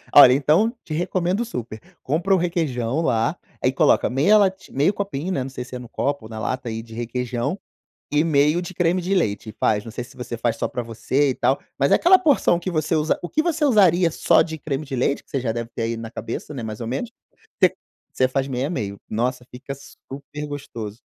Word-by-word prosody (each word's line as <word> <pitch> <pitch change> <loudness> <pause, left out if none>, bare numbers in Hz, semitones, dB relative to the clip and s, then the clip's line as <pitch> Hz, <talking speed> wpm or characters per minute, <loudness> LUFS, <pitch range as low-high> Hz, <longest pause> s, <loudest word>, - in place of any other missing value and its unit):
Olha, 135 -3 +10
então 155 - +3
te - - -13
recomendo 180 +5 0
super, 120 - -6 0.2
compra 170 +8 +1
o 190 - +5
requeijão 155 -7 -1
lá, 115 -7 +1 0.3
aí - - +4
coloca - - +3
meia 145 +12 +4
lati 190 -2 0
meio 145 +8 +3
copinho, 190 -4 -3
né, 135 -7 -1
não 135 - -6
sei 130 -1 -6
se 125 - -9
é 125 - -5
no 120 - -9
copo 140 0 -2
ou 110 - -10
na 110 - -6
lata 125 +2 -3
aí 115 0 -4
de 115 -1 -12
requeijão, 125 - -2 0.5
e 150 +2 +3
meio 150 +2 +3
de 180 +1 -7
creme 175 +1 +2
de 185 +3 -1
leite 110 - 0
e - - -6
faz. 105 -1 +2
Não 115 - -7
sei 120 +1 -5
se - - -16
você 125 -1 -5
faz 115 0 0
só - - -1
pra 125 - -4
você 130 +5 0
e 130 - -1
tal, 135 - +1 0.2
mas 140 0 +2
é - - +8
aquela 370 +2 +6
porção 275 - +3
que 175 - -4
você 155 0 0
usa 155 0 +1
o 175 - -4
que 310 - +1
você 330 -2 0
usaria 185 - +5
só - - +4
de 160 -1 -6
creme 150 0 -3
de 135 - -4
leite, 130 +3 0
que - - -32
você 135 - 0
já 120 -3 -1
deve 115 0 -4
ter - - -3
aí 115 0 -2
na 115 0 -7
cabeça, 115 +7 -6
né, 130 - -5
mais 110 0 -5
ou 115 - -4
menos, 140 - -3 0.5
se - - +7 0.4
você 130 - +3
faz 135 +1 -1
meio 130 +1 -1
a - - -5
meio. 100 - -4
Nossa, 125 +3 -1
fica 130 +2 -7
super 140 +2 -9
gostoso. 120 -6 -7
140 Hz, 240 wpm, -22 LUFS, 120-170 Hz, 0.5 s, Olha